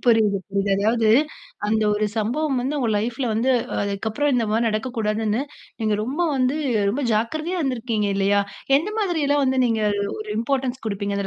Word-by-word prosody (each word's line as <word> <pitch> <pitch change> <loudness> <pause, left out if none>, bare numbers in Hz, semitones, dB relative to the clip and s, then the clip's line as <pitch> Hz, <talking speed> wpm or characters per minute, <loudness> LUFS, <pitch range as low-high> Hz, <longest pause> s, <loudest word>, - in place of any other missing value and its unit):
புரியுது, 220 -4 +4
புரியுது. 200 0 0 0.2
அதாவது 225 -1 +3 0.6
அந்த 220 +1 +1
ஒரு 210 0 +1
சம்பவம் 255 +5 0
வந்து 275 +4 -2
உங்க 245 - 0
லைஃப்புல 240 +4 -1
வந்து, 230 +5 +1 0.3
அதுக்கப்புறம் 220 +8 -1
இந்த 235 - +2
மாரி 225 +2 +2
நடக்கக்கூடாதுன்னு, 215 0 -1 0.4
நீங்க 215 -1 +2
ரொம்ப 265 +8 -4 0.2
வந்து 255 +3 +1 0.3
ரொம்ப 280 +6 -2
ஜாக்கிரதையா 310 +12 -1
இருந்துருக்கீங்க, 235 -6 -1
இல்லையா? 200 +1 +3 0.4
எந்த 380 +9 -1
மாதிரியெல்லாம் 300 -8 +1
வந்து, 260 0 +1
நீங்க 225 -2 0 0.4
ஒரு 215 0 -7
இம்பார்ட்டன்ஸ் 260 +1 -1
குடுப்பீங்க, 200 -1 -2
அந்த 195 - -2
230 Hz, 155 wpm, -23 LUFS, 215-265 Hz, 0.6 s, புரியுது